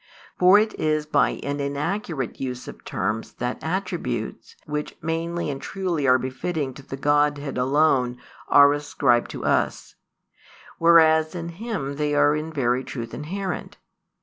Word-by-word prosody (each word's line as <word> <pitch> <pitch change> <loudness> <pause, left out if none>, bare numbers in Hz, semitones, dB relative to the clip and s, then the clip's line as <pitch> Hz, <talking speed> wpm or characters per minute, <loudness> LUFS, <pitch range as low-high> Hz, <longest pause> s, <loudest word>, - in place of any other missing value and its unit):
For 185 +2 +7
it 215 +1 +2
is 155 -1 +1
by 150 -2 +1
an 145 +1 -3
inaccurate 145 - -3
use 125 -1 -4
of - - -10
terms 110 +4 -3
that 125 +1 -4
attributes, 165 - -3
which 150 0 -4
mainly 165 0 -2
and 135 - -6
truly 175 -7 -2
are 130 0 +6
befitting 130 +2 -3
to 140 - -11
the 135 0 -8
Godhead 145 0 +1
alone, 130 -1 +2 0.3
are 145 0 +7
ascribed 140 -4 +1
to - - -6
us; - - 0 0.9
whereas 160 -1 +5
in 170 -1 -4
Him 170 -7 -4
they 150 0 0
are 145 +1 +4
in 155 +1 -4
very 130 -3 0
truth 120 -3 -6
inherent. 180 +5 -5
145 Hz, 145 wpm, -24 LUFS, 135-165 Hz, 0.9 s, For